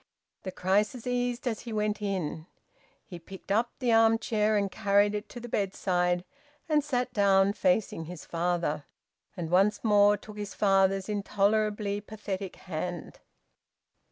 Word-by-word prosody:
The 185 - -5
crisis 205 +7 0
eased 245 +1 -1
as 225 -3 -1
he 235 - -8
went 210 -1 -1
in. 175 -5 -3 0.6
He 175 -3 -9
picked 190 +3 -10
up 230 +4 +2
the 250 -3 0
arm 225 0 +5
chair 215 -1 +1
and 200 -1 0
carried 205 0 +2
it 210 +1 -4
to 245 - -8
the 240 - -8
bedside 180 -4 0 0.4
and 305 -2 +2
sat 250 -3 -1
down 200 -1 +4
facing 185 -4 0
his 175 0 -9
father, 170 -3 -1 0.5
and 170 -2 -4
once 195 +4 +3
more 205 -1 +5
took 210 +1 -12
his 205 -1 -6
father's 195 -1 +2
intolerably 205 0 0
pathetic 200 -3 -6
hand. 175 -1 -6
205 Hz, 145 wpm, -28 LUFS, 185-220 Hz, 0.6 s, arm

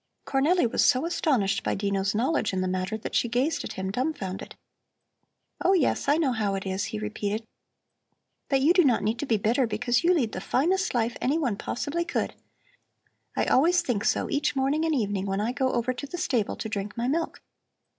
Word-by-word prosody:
Cornelli 295 +6 +2
was 230 - +1
so 260 +2 +3
astonished 265 - +1
by - - 0
Dino's 200 0 -1
knowledge 235 -1 +1
in 185 - 0
the 185 - 0
matter 185 +3 -2
that 220 - -7
she 240 - +1
gazed 255 +7 0
at - - -6
him 190 0 -3
dumfounded. 245 -6 -3 1.1
"Oh, 380 - +4
yes, 340 -8 +1
I 290 - +4
know 305 -5 +2
how 210 -4 0
it 195 - -4
is," 190 +1 -2
he 215 - -4
repeated. 210 +1 -3 1.0
"But 270 -1 +2
you 310 +6 +5
do 360 - +5
not 255 -6 +3
need 220 +3 -1
to 290 - -3
be 225 - +2
bitter, 235 +5 +1
because 240 +6 0
you 360 +2 +4
lead 240 -9 +1
the - - -5
finest 365 +5 +1
life 235 0 0
anyone 270 -5 +1
possibly 290 +11 -2
could. - - -2 1.0
I - - +2
always 345 +7 +4
think 225 -5 -1
so 245 - +1
each 295 +1 0
morning 275 +4 +1
and 320 -2 +1
evening 200 -5 -1
when 195 0 -1
I 220 +3 0
go 260 0 0
over 240 +1 0
to 270 +3 -7
the 355 - -6
stable 245 - 0
to - - -5
drink 205 0 -4
my 235 +1 -1
milk. 325 +5 -1
245 Hz, 205 wpm, -26 LUFS, 210-290 Hz, 1.1 s, you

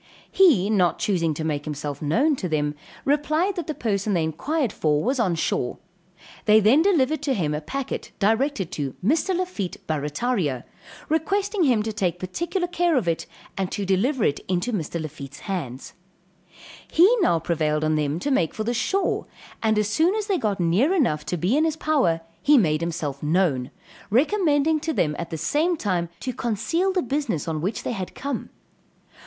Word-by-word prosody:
he 290 - +5
not 180 -6 +2
choosing 170 -5 +1
to 155 +1 -4
make 150 -2 -2
himself 145 -2 -5
known 250 - +2
to 185 -8 -4
them, 150 -2 0 0.3
replied 305 +7 +1
that 345 - -4
the 310 - -2
person 205 -3 -1
they 165 - +2
inquired 245 - -1
for 150 -1 +1
was 260 +3 0
on 185 -7 +2
shore. 125 -6 -1 0.7
They 215 0 +6
then 225 +9 +5
delivered 310 -6 +2
to 280 -3 0
him 155 -6 0
a 150 - -2
packet 275 - -5
directed 220 - +1
to 140 -3 -4
Mr. 330 - +2
Lafitte, 355 - -3
Barrataria, 150 - -1 0.4
requesting 385 +4 +1
him 240 -6 +3
to 220 0 -3
take 185 -5 -1
particular 340 - -2
care 350 -1 +1
of 230 - 0
it, 165 -1 -1 0.3
and 190 -1 -2
to 200 - -2
deliver 215 +7 +1
it 145 - +1
into 185 +7 -1
Mr. 170 -3 -2
Lafitte's 145 -3 -8
hands. 140 - -5 1.0
He 375 +9 +6 0.3
prevailed 155 -2 0
on 155 0 +2
them 150 0 0
to 285 - -1
make 170 - +1
for 215 - -2
the 235 +2 -1
shore, 380 - 0 0.3
and 220 -1 +2
as 210 -1 +2
soon 320 - +2
as 430 -2 -1
they 395 -4 0
got 205 -3 -1
near 195 - +2
enough 155 - +1
to 180 - -1
be 180 - +1
in 305 - +3
his 320 -1 0
power, 265 - +1 0.2
he 295 0 +5
made 155 -8 +2
himself 160 -5 -3
known, 150 -5 +1 0.4
recommending 310 - +2
to 320 +1 -2
them 150 - +1
at 170 - -4
the 160 - -4
same 310 - +1
time 180 - -1
to 255 - -3
conceal 250 - 0
the 370 -1 0
business 260 - -2
on 155 -2 -2
which 200 +6 -2
they - - -2
had 190 -6 -5
come. 275 -3 -4
210 Hz, 180 wpm, -24 LUFS, -, 1.0 s, They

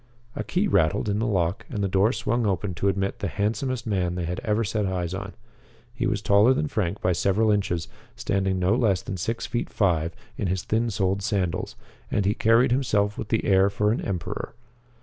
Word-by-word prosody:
A - - -3
key 190 +4 0
rattled 85 - +2
in 100 +1 0
the 115 - 0
lock 95 -4 0
and 105 -5 -3
the - - +2
door 95 +4 +3
swung 120 0 0
open 95 -1 -1
to 95 - -1
admit 95 0 -1
the 100 - -2
handsomest 115 - -2
man 90 -5 0
they 90 -1 -2
had 90 +2 -3
ever 110 +1 0
set 105 -1 -1
eyes 90 -2 -2
on. 100 +1 -5 0.6
He 120 +1 -1
was 115 -3 -1
taller 105 +6 +5
than 150 +2 -1
Frank 105 -6 -2
by 90 - +2
several 100 +5 +2
inches, 95 -5 0 0.3
standing 95 -1 0
no 90 +3 +2
less 110 -6 +2
than 100 -6 -5
six 115 +6 -2
feet 120 - -3
five 85 -5 +1 0.2
in 100 - 0
his 90 0 -1
thin 115 +2 0
soled 100 -1 0
sandals, 95 -5 -1 0.3
and 100 - 0
he 100 - +3
carried 115 +3 +3
himself 105 -6 +1
with - - -5
the 110 0 0
air 95 0 +4
for 105 +1 +1
an 115 - -1
emperor. 90 -4 -4
100 Hz, 210 wpm, -25 LUFS, 95-110 Hz, 0.6 s, taller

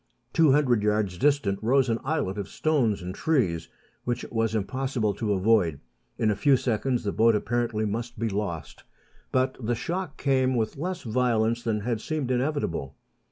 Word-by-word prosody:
Two 160 -4 +5
hundred 130 -6 +3
yards 105 -3 +1
distant 140 -9 +2
rose 130 +4 +3
an 115 -1 0
islet 135 -10 -1
of 100 -1 -5
stones 125 - +1
and 90 +1 -5
trees, 100 - 0 0.3
which 120 0 -2
it - - -10
was 115 -1 0
impossible 120 0 -1
to 105 +1 -1
avoid. 95 -6 +2 0.4
In 110 - +2
a - - 0
few 140 +5 +4
seconds 125 +1 0
the 100 - -1
boat 115 +1 +4
apparently 115 0 0
must 115 +3 -4
be 115 +1 -1
lost; 95 -7 -4 0.5
but 130 0 +1
the 120 0 -1
shock 170 +4 -4
came 130 -2 +2
with 110 -2 -1
less 180 +5 -4
violence 115 -1 +1
than 110 -3 -1
had 115 0 -2
seemed 150 -3 -2
inevitable. 125 - -1
115 Hz, 170 wpm, -26 LUFS, 105-130 Hz, 0.5 s, Two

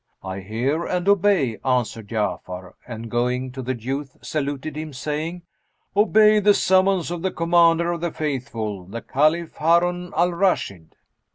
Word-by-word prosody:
"I 95 0 -5
hear 120 - -1
and 180 +1 -2
obey," 190 - +3
answered 125 -4 -1
Ja'afar 95 -4 -3
and, 115 -1 -7
going 125 +2 -1
to 130 +1 -6
the 130 -1 -3
youth, 135 +4 -4
saluted 145 +2 -3
him, 155 -1 -6
saying, 155 +6 -4 0.5
"Obey 215 +1 +5
the 205 0 +4
summons 190 -2 +2
of 175 -1 -4
the 190 - 0
Commander 170 0 +3
of 170 -2 -4
the 175 - 0
Faithful, 115 -11 -4
the 115 +6 -7
Caliph 155 +4 +1
Harun 175 +2 +2
al 175 +2 +3
Rashid." 170 - -1
150 Hz, 150 wpm, -23 LUFS, 120-175 Hz, 0.5 s, Obey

